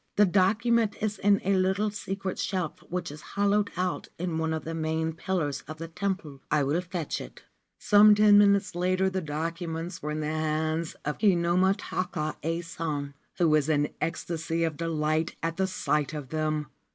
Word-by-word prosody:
The 210 - +6
document 210 +4 +2
is 215 -2 -2
in 200 0 +4
a 195 - +2
little 190 +3 +1
secret 195 -2 -4
shelf 180 -5 -2
which 175 -1 -3
is 150 - -10 0.2
hollowed 205 0 +2
out 180 0 -1
in 170 -2 -2
one 160 0 0
of 160 -2 -2
the 165 - -5
main 160 0 -1
pillars 160 -5 -2
of 155 +1 -7
the 165 +1 -6
temple. 175 -6 -3
I 150 -1 +2
will 150 +6 +1
fetch 175 -3 -4
it.' - - -11 0.3
Some 210 0 +6
ten 205 -1 +7
minutes 200 -1 +4
later 185 +2 +1
the 190 0 -1
documents 165 +2 -4
were 150 - -4
in 155 +1 -2
the - - -2
hands 155 +1 -1
of 150 - -2
Kinomi 185 -1 +3
ta 185 -1 -2
ka 155 -4 -3
Ason, 165 -3 -3 0.2
who 175 - +3
was 155 -1 +3
in 145 -1 +1
ecstasy 165 0 -2
of 160 -2 -1
delight 155 0 -1
at 165 0 -1
the 190 0 +1
sight 150 -5 -1
of 145 -4 -6
them. 155 0 -1
170 Hz, 180 wpm, -28 LUFS, 155-190 Hz, 0.3 s, ten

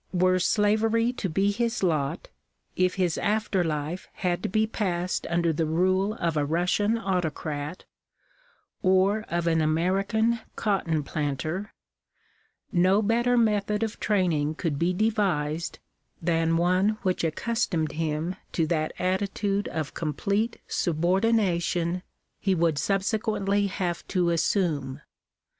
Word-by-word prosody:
Were 185 0 +3
slavery 220 +4 +2
to 205 -6 -3
be 195 +5 +2
his 235 +1 -1
lot 155 -3 0 0.2
— - - -46
if 185 - -1
his 180 -4 0
after 210 -3 +1
life 155 +2 -3
had 180 -1 -1
to - - -2
be 215 +3 +2
passed 185 -5 -2
under 170 -1 +1
the 160 +1 0
rule 185 +5 +1
of 170 -6 -1
a 150 - +2
Russian 180 +8 +1
autocrat, 165 -5 -3 1.0
or 190 +3 +3
of 170 0 -1
an 165 -1 +2
American 195 +9 +1 0.2
cotton 170 -7 0
planter, 155 +7 -3 1.0
no 190 +2 +3
better 240 +3 +2
method 210 -1 +2
of 220 -1 -4
training 165 -7 +1
could 155 -4 -2
be 170 +2 +2
devised 180 -7 0 0.4
than 165 -1 +1
one 185 +5 +2
which 185 -3 0
accustomed 170 -1 -1
him 160 +2 -2 0.2
to 165 - +1
that 155 -1 -1
attitude 195 +2 -1
of 155 -4 -4
oomplete 200 - -1
subordina 185 +3 +1
tion 175 +1 -1 0.4
he 195 -2 +1
would 165 -4 +1
subsequently 200 - 0
have 180 -3 -3
to 180 -3 +1
assume. 160 -6 0
185 Hz, 125 wpm, -26 LUFS, 165-205 Hz, 1.0 s, Were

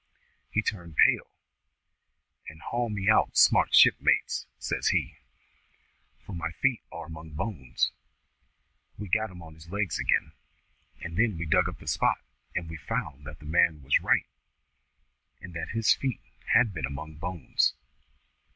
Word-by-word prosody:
He 110 - 0
turned 85 -7 -4
pale, - - +4 1.2
and 80 - -13
'Haul 120 +6 -2
me 100 -2 -3
out 110 - +4
smart, - - +5
shipmates,' - - +4
says - - -2
he, - - 0 1.1
'for 100 - -8
my 85 -1 -3
feet 125 +8 0
are 85 0 -7
among 80 0 -10
bones.' 75 - -2 1.1
We 105 - -6
soon 90 - -12
got 110 +2 +2
him 90 -2 -11
on 80 -1 -12
his 80 +1 -15
legs 100 -4 -2
again, - - +1 0.7
and 85 0 -6
then 110 -5 +2
we 85 - -3
dug 75 - +3
up - - -9
the - - -15
spot, - - +2 0.4
and 85 - -2
we 80 0 -7
found 70 -2 -4
that 75 0 -8
the 75 - -15
man 80 -1 +2
was 70 - +3
right, - - +2 1.1
and 90 - -10
that 85 - -5
his 115 -1 +3
feet 130 -7 -3 0.3
had 115 -3 +4
been 80 -7 -2
among 75 +3 -8
bones. 90 +1 0
85 Hz, 155 wpm, -28 LUFS, 80-105 Hz, 1.2 s, smart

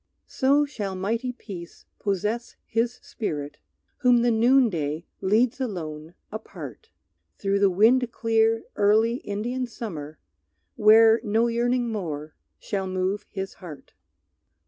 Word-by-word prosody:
So 280 +3 +2
shall 210 -9 -5
mighty 225 +7 -1
peace 190 -8 -10
possess 210 +4 -2
his 235 +2 0
spirit 150 -9 -5 0.4
Whom 245 -3 +4
the 240 - +3
noonday 220 - +2 0.2
leads 225 +7 +2
alone 160 -8 -5 0.2
apart, 215 +1 -9 0.5
Through 200 0 0
the 200 -1 +5
wind 230 +6 +4
clear 225 -1 +2
early 220 +3 +3
Indian 240 +4 -3
summer, 160 -11 -7 0.6
Where 220 +1 +6
no 220 +1 +2
yearning 240 +1 0
more 155 -7 -4 0.2
shall 195 -2 -3
move 185 +2 -2
his 195 -1 -5
heart. 160 -6 -11
215 Hz, 115 wpm, -25 LUFS, 190-235 Hz, 0.6 s, Where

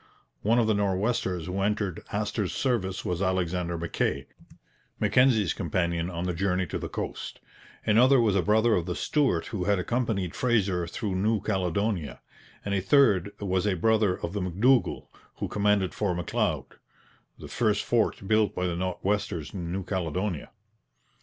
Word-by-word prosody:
One 115 +3 +2
of 120 - +4
the 110 - +2
Nor'westers 95 -3 0
who 95 +2 -3
entered 100 -3 -1
Astor's 105 -1 -2
service 115 -8 -1
was 90 0 -2
Alexander 90 -2 -1
Mackay, 80 -4 -1 0.7
Mackenzie's 120 - +3
companion 85 -1 -1
on 85 -1 -4
the 90 0 -1
journey 95 +1 0
to - - -4
the - - -5
coast; - - -5 0.5
another 125 +5 +5
was 110 -4 +3
a 95 - +3
brother 110 +6 +3
of 90 -3 0
the 90 - -2
Stuart 135 - +1
who 95 -4 -2
had 100 0 +2
accompanied 100 -3 -1
Fraser 100 -8 +1
through 100 +3 -3
New 110 +3 +1
Caledonia; 95 -4 -1 0.5
and 100 - -1
a 95 - +1
third 100 -4 +4
was 95 0 0
a 100 - +1
brother 105 +1 +2
of 85 - -4
the 105 - -2
M'Dougall 110 +8 +2 0.3
who - - -3
commanded 100 -3 +1
Fort 95 -4 -1
M'Leod, 90 - -2 0.6
the - - -9
first - - +1
fort 95 - 0
built 110 -1 +2
by 90 - -1
the 90 -1 -1
Nor'westers 90 -2 -2
in 85 -4 -5
New 95 +1 -2
Caledonia. 90 -1 -3
95 Hz, 160 wpm, -27 LUFS, 90-105 Hz, 0.7 s, another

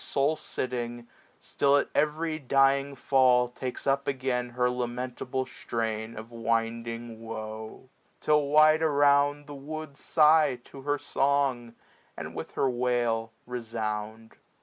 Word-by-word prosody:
Sole 140 +3 +1
sitting, 120 -4 -5 0.3
still 140 0 +2
at - - +1
every 155 +1 0
dying 140 0 +2
fall 125 -2 +4
Takes 125 +1 -6
up 140 0 +1
again 130 -2 -1
her 125 +1 +1
lamentable 125 +1 -3
strain 110 -2 -4
Of 110 +2 -9
winding 115 0 -2
woe; 110 +1 -7 0.3
till 150 -1 +2
wide 155 +2 +5
around, 145 -1 +3
the 145 - -9
woods 145 +1 -7
Sigh 155 -3 +4
to 135 - -12
her 145 +1 0
song, 135 -5 0 0.4
and - - -6
with - - -7
her - - +2
wail 120 -2 0
resound. 110 -2 -5
125 Hz, 125 wpm, -28 LUFS, 115-140 Hz, 0.4 s, wide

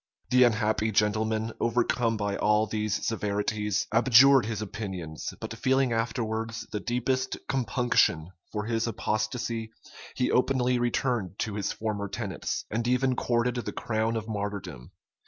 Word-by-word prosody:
The 125 0 +7
unhappy 110 -1 +1
gentleman, 110 +2 +1
overcome 115 -1 +1
by 100 -1 -1
all 105 +1 +3
these 110 -1 -2
severities, 105 -1 -1
abjured 130 +1 +6
his 110 -3 -3
opinions; 95 -7 -5
but - - -5
feeling 130 -2 +2
afterwards 115 -1 -2
the 105 - -2
deepest 130 +3 -1
compunction 120 - +1 0.2
for 105 -1 -3
his 115 0 0
apostasy, 115 +1 -2 0.5
he 125 - +1
openly 125 -1 +2
returned 120 -5 -1
to 110 - -2
his 100 -1 -2
former 105 -2 -3
tenets, 100 -1 -4
and 115 +2 -1
even 125 +1 +2
courted 120 0 0
the 120 - -4
crown 110 0 -1
of 110 -1 -3
martyrdom. 100 - -5
110 Hz, 135 wpm, -28 LUFS, 105-120 Hz, 0.5 s, The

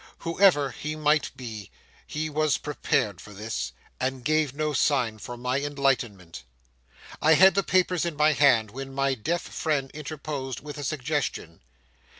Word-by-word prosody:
Whoever 165 -5 +3
he 155 +1 -5
might 150 0 +2
be, 110 -6 -7 0.4
he 155 +1 -3
was 155 0 +1
prepared 110 - -1
for 105 - -12
this, 105 - -4 0.3
and 130 -1 -2
gave 155 -2 +2
no 150 +2 -2
sign 125 -7 +1
for 120 +3 -7
my 125 +2 -1
enlightenment. 125 - -1 0.8
I 160 +1 +6
had 190 +3 +7
the 195 - +2
papers 185 -2 +2
in 170 -3 -2
my 155 +1 +4
hand, 120 -8 +4
when 135 +2 -7
my 135 0 +2
deaf 160 +9 -2
friend 145 -4 -2
interposed 145 -3 -5
with 150 0 -8
a - - -5
suggestion. 140 - -3
140 Hz, 155 wpm, -26 LUFS, 125-155 Hz, 0.8 s, had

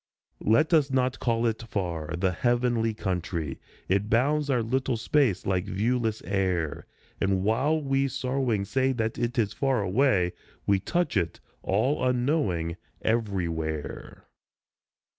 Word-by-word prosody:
Let 155 +10 +4
us 150 -4 +4
not 130 -1 0
call 115 -1 +1
it 115 -1 0
far 85 -7 -3
the 95 +1 +1
heavenly 120 +1 +1
country; 90 -7 -3 0.3
It 100 +3 +1
bounds 145 +5 +2
our 125 -4 +2
little 130 +1 0
space 115 -4 +1
like 95 -1 0
viewless 110 +2 0
air, 90 -6 -1 0.3
And 95 -1 +1
while 130 +10 +2
we 135 -1 +1
sorrowing 125 -5 -1
say 130 +5 +1
that 110 -2 -2
it 120 +1 -1
is 105 -3 +1
far 130 -1 +1
away 95 -3 +2 0.3
We 100 -1 +3
touch* 175 - -1
it, 85 -4 0 0.2
all 125 +9 +1
unknowing, 120 - 0 0.3
everywhere. 85 -9 -2
115 Hz, 130 wpm, -27 LUFS, 95-130 Hz, 0.3 s, Let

